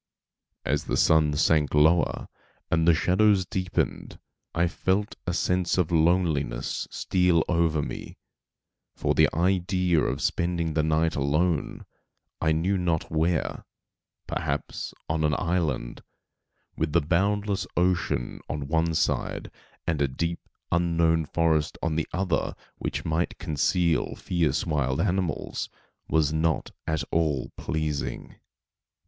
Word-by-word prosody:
As 75 Hz, +2 st, 0 dB
the -, -, -1 dB
sun 75 Hz, -2 st, +4 dB
sank 75 Hz, -2 st, +2 dB
lower 80 Hz, +4 st, +3 dB, 0.4 s
and 80 Hz, 0 st, +2 dB
the 85 Hz, -, +6 dB
shadows 95 Hz, +3 st, +3 dB
deepened, 90 Hz, -1 st, -2 dB, 0.4 s
I 85 Hz, +1 st, +3 dB
felt 95 Hz, +4 st, 0 dB
a 90 Hz, -, 0 dB
sense 90 Hz, -1 st, +1 dB
of 90 Hz, -3 st, +1 dB
loneliness 80 Hz, -7 st, +1 dB
steal 90 Hz, -3 st, +2 dB
over 85 Hz, -4 st, +1 dB
me, -, -, -7 dB, 0.8 s
for -, -, 0 dB
the -, -, +4 dB
idea 90 Hz, -1 st, +2 dB
of -, -, -1 dB
spending 85 Hz, -2 st, 0 dB
the 80 Hz, -, +2 dB
night 80 Hz, +1 st, +1 dB
alone, 75 Hz, +3 st, 0 dB, 0.6 s
I 80 Hz, -, +2 dB
knew 90 Hz, +5 st, +1 dB
not 85 Hz, -3 st, -1 dB
where, 80 Hz, +1 st, 0 dB, 0.6 s
perhaps -, -, -3 dB, 0.2 s
on 80 Hz, 0 st, 0 dB
an 75 Hz, -1 st, +2 dB
island, 85 Hz, -8 st, -1 dB, 0.7 s
with 75 Hz, -1 st, -2 dB
the 85 Hz, -, +4 dB
boundless 100 Hz, +4 st, 0 dB
ocean 90 Hz, -8 st, 0 dB
on 70 Hz, -1 st, -3 dB
one 80 Hz, +1 st, +1 dB
side, -, -, -1 dB, 0.3 s
and 80 Hz, -4 st, 0 dB
a 70 Hz, -, +3 dB
deep, 85 Hz, +6 st, -2 dB, 0.3 s
unknown 85 Hz, -2 st, +2 dB
forest 80 Hz, -1 st, +1 dB
on 80 Hz, -1 st, 0 dB
the 80 Hz, -, -1 dB
other 90 Hz, -3 st, -1 dB, 0.2 s
which -, -, -3 dB
might 80 Hz, +2 st, -1 dB
conceal 85 Hz, 0 st, +1 dB
fierce 80 Hz, -5 st, 0 dB
wild 70 Hz, -4 st, 0 dB
animals, 90 Hz, -1 st, -1 dB, 0.4 s
was 80 Hz, -2 st, +2 dB
not 80 Hz, 0 st, 0 dB, 0.2 s
at 80 Hz, -2 st, 0 dB
all 75 Hz, -6 st, 0 dB
pleasing. 75 Hz, -2 st, -3 dB
80 Hz, 125 wpm, -26 LUFS, 75-90 Hz, 0.8 s, the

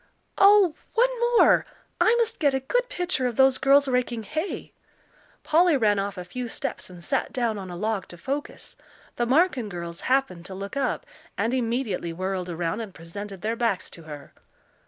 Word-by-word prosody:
"Oh, 395 Hz, -4 st, +7 dB, 0.2 s
one -, -, +5 dB, 0.3 s
more! -, -, +6 dB, 0.4 s
I 450 Hz, -, +5 dB
must 465 Hz, -1 st, 0 dB
get 285 Hz, -5 st, +3 dB
a -, -, +1 dB
good -, -, -1 dB
picture 355 Hz, -, -1 dB
of 240 Hz, -, -3 dB
those 265 Hz, +1 st, +4 dB
girls 280 Hz, +1 st, +5 dB
raking 250 Hz, -3 st, 0 dB
hay." 315 Hz, -, -4 dB, 0.7 s
Polly 330 Hz, -1 st, +4 dB
ran 210 Hz, -4 st, +2 dB
off 200 Hz, 0 st, -3 dB
a 180 Hz, -, -6 dB
few 245 Hz, +7 st, -5 dB
steps 225 Hz, -, -4 dB
and 175 Hz, -1 st, -12 dB
sat 270 Hz, -, -1 dB
down 230 Hz, -4 st, -1 dB
on 190 Hz, -1 st, -7 dB
a 175 Hz, -, -6 dB
log 210 Hz, +2 st, -2 dB
to 175 Hz, -, -12 dB
focus. 275 Hz, +10 st, -5 dB, 0.4 s
The 240 Hz, -, 0 dB
Marken 260 Hz, -, +2 dB
girls 170 Hz, -1 st, -6 dB
happened 255 Hz, -10 st, 0 dB
to 190 Hz, -, -7 dB
look 200 Hz, +5 st, -6 dB
up, 280 Hz, -, -1 dB, 0.3 s
and 230 Hz, +2 st, 0 dB
immediately 230 Hz, -8 st, -1 dB
whirled 185 Hz, +1 st, -3 dB
around 170 Hz, +5 st, -2 dB
and 210 Hz, -4 st, -8 dB
presented 195 Hz, +4 st, -8 dB
their 225 Hz, +2 st, 0 dB
backs 225 Hz, -6 st, -1 dB
to 170 Hz, -, -10 dB
her. 150 Hz, -3 st, -10 dB
230 Hz, 180 wpm, -25 LUFS, 185-275 Hz, 0.7 s, Oh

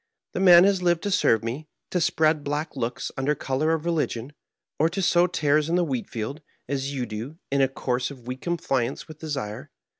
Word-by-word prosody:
The -, -, -2 dB
man 180 Hz, -2 st, +8 dB
has 195 Hz, -1 st, +3 dB
lived 175 Hz, -2 st, +2 dB
to 205 Hz, -, -1 dB
serve 115 Hz, -, +3 dB
me, 130 Hz, +7 st, -4 dB, 0.2 s
to 180 Hz, -, +1 dB
spread 155 Hz, -1 st, +2 dB
black 145 Hz, +2 st, -3 dB
looks 120 Hz, -2 st, -3 dB
under 140 Hz, +3 st, +1 dB
color 140 Hz, +3 st, 0 dB
of 160 Hz, 0 st, -2 dB
religion, 150 Hz, -6 st, -1 dB, 0.5 s
or 160 Hz, +2 st, +4 dB
to 185 Hz, -, -4 dB
sow 175 Hz, -1 st, +4 dB
tares 155 Hz, -2 st, +1 dB
in 170 Hz, -, +2 dB
the 180 Hz, -, +3 dB
wheat 130 Hz, -7 st, -3 dB
field, 115 Hz, +7 st, -5 dB, 0.3 s
as 135 Hz, 0 st, -2 dB
you 130 Hz, -3 st, -2 dB
do, 115 Hz, +8 st, -6 dB
in 140 Hz, 0 st, +3 dB
a 135 Hz, -, +5 dB
course 125 Hz, -1 st, -2 dB
of 130 Hz, -4 st, -12 dB
weak 125 Hz, +1 st, -6 dB
compliance 135 Hz, -7 st, -1 dB
with 155 Hz, -1 st, -11 dB
desire. 135 Hz, -9 st, -5 dB
145 Hz, 205 wpm, -25 LUFS, 130-165 Hz, 0.5 s, man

